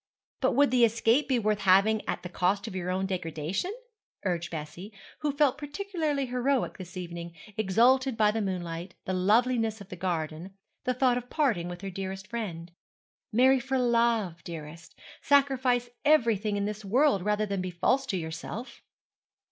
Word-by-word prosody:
'But 260 - +1
would 285 -1 +4
the 250 -2 +4
escape 230 +4 +3
be 260 -3 +2
worth 215 -2 +1
having 200 +3 +4
at - - -2
the - - -4
cost 185 +3 0
of - - -6
your 180 -1 -3
own 190 +1 0
degradation?' 180 - -3 0.5
urged 175 -2 -1
Bessie, 160 +5 -7 0.3
who 300 - 0
felt 285 -1 +2
particularly 305 -2 -2
heroic 250 -1 0
this 180 0 -9
evening, 170 -1 -6 0.2
exalted 240 +5 +3
by 210 -1 +4
the 220 +1 -2
moonlight, 175 -2 -4
the 185 - -2
loveliness 225 +4 +2
of 200 -1 -12
the - - -6
garden, 170 0 -3 0.3
the 255 - +1
thought 250 -1 +3
of 245 0 -14
parting 230 - +1
with 175 0 -7
her 195 -1 -5
dearest 190 +1 -5
friend. 180 -8 -5 0.6
'Marry 260 +4 +5
for 265 +2 -1
love, 230 -8 +1
dearest. 165 0 -9 0.2
Sacrifice 260 -4 +2
everything 225 -9 +3
in 200 - -1
this 210 +1 -4
world 240 +1 +3
rather 210 +2 +1
than 200 -2 -2
be 185 - -3
false 260 +10 +1
to 195 - -1
yourself.' 165 +9 -6
210 Hz, 165 wpm, -28 LUFS, 180-255 Hz, 0.6 s, Marry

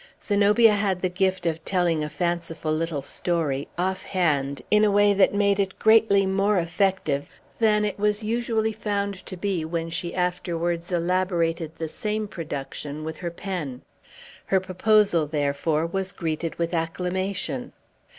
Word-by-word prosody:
Zenobia 210 +2 +4
had 195 -3 0
the 185 - +2
gift 185 0 0
of 165 -1 -1
telling 175 -5 +1
a 150 - -3
fanciful 165 0 -2
little 155 -3 -2
story, 145 -3 -1
off 185 +2 -1
hand, 140 -7 0
in 210 0 +5
a 210 - +5
way 205 0 +4
that 195 -1 +4
made 200 0 +2
it 195 -1 -1
greatly 220 -3 +5
more 195 +2 +2
effective 170 -4 0 0.3
than 210 -2 +3
it 205 -1 -3
was 210 +1 +1
usually 220 0 0
found 200 -2 -2
to 185 - -7
be 185 -3 -1
when 165 +1 -3
she 170 +1 -4
afterwards 175 -1 -1
elaborated 170 -2 0
the 160 - -4
same 210 +6 -3
production 150 -3 -6
with 160 0 -5
her 175 - -4
pen. 170 -8 -5 0.6
Her 190 - +3
proposal, 190 -3 +2
therefore, 150 +1 0
was 190 +2 -2
greeted 165 -2 -3
with 170 +1 -1
acclamation. 185 +8 -2
180 Hz, 150 wpm, -25 LUFS, 165-200 Hz, 0.6 s, in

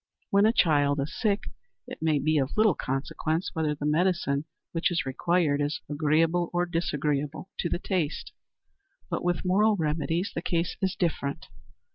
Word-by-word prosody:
When 200 +2 +5
a - - +5
child 145 -8 +3
is 140 +3 -3
sick, 210 -3 +1 0.4
it - - -9
may 160 -2 +2
be 155 +1 +2
of 135 +6 -2
little 215 -3 +5
consequence 155 +5 -2
whether 155 -2 0
the 145 - -5
medicine 155 -3 +1 0.3
which 165 0 +1
is 175 -4 -1
required 145 +2 +1
is 145 +1 -1
agreeable 160 +3 +2
or 175 0 +2
disagreeable 150 -1 -2
to 170 - 0
the - - 0
taste. 175 -4 -2 0.8
But 170 - -2
with 175 0 0
moral 210 +4 +4
remedies 165 +2 -1
the 165 - -3
case 170 -1 -1
is 190 -1 0
different. 145 -5 -2
165 Hz, 160 wpm, -27 LUFS, 145-175 Hz, 0.8 s, When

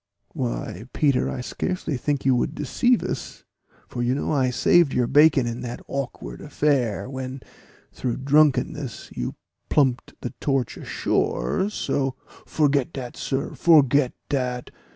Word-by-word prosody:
"Why, 115 - -4
Peter, 140 -4 +2
I 125 - -4
scarcely 165 +3 -3
think 140 +2 -1
you 130 -1 +4
would 120 - -1
deceive 240 - +2
us, - - -5 0.4
for 120 - -5
you 120 +2 +1
know 145 - -2
I 135 -4 +2
saved 140 +4 +4
your 125 - +3
bacon 145 0 +5
in 120 0 -4
that 120 -1 -5
awkward 120 - -5
affair, 130 -9 0
when 130 0 -6 0.5
through 125 -3 -2
drunkenness 140 -3 +1
you - - -3 0.3
plumped 130 -4 +1
the 125 - -5
Torch 135 -4 0
ashore, 65 - -1
so 135 -10 -1
" - - -21
"Forget 145 -2 +1
dat, 125 -5 -6
sir 135 +1 -2
forget 145 -5 +4
dat! 125 -3 -2
135 Hz, 140 wpm, -24 LUFS, 125-145 Hz, 0.5 s, bacon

